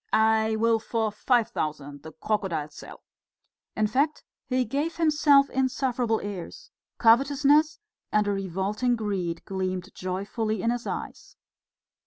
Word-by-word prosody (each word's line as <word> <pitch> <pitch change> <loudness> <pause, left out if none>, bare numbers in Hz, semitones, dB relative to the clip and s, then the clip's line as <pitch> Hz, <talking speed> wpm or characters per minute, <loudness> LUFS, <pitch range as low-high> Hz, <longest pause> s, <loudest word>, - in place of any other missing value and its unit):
I 220 0 +3
will 225 +1 +2
for 220 -1 -1
five 235 +2 +1
thousand 145 -2 -4
the 160 - -10
crocodile 180 -6 -2
sell!" - - -12 0.7
In 215 - +1
fact 275 +8 0 0.2
he 255 -1 +1
gave 290 +8 -2
himself 295 -4 +4
insufferable 255 -3 0
airs. 205 - -7 0.3
Covetousness 285 +6 +4 0.3
and 210 -1 +2
a - - +1
revolting 195 +5 -1
greed 190 -7 -3
gleamed 185 0 -3
joyfully 200 +3 -3
in 230 - +2
his 240 0 -4
eyes. - - -6
220 Hz, 125 wpm, -26 LUFS, 195-255 Hz, 0.7 s, himself